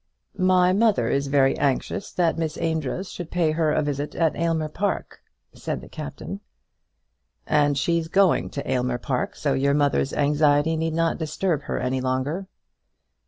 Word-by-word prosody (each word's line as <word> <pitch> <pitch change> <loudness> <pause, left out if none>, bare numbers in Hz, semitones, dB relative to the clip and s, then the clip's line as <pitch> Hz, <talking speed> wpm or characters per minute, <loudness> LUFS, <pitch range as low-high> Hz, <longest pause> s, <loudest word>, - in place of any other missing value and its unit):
"My 185 0 +4
mother 205 - +2
is 140 0 0
very 135 -1 +3
anxious 140 +8 -1
that 170 -2 +2
Miss 160 -1 -3
Amedroz 160 +2 -2
should 175 -3 -7
pay 170 -3 +1
her 155 -1 +1
a 150 - +1
visit 145 0 -3
at 165 -2 +1
Aylmer 165 -2 0
Park," 190 +6 -3 0.3
said - - -4
the - - -12
Captain. - - -7 1.1
"And 145 -1 +2
she's 165 +4 0
going 190 +1 +3
to 140 - -6
Aylmer 125 -1 0
Park, 125 +1 -2
so 140 -2 0
your 140 +1 +2
mother's 145 -2 +1
anxiety 145 +1 +2
need 160 0 -1
not 165 +1 +1
disturb 160 0 -1
her - - -2
any 130 +1 -1
longer." 130 +9 -2
155 Hz, 160 wpm, -24 LUFS, 140-170 Hz, 1.1 s, My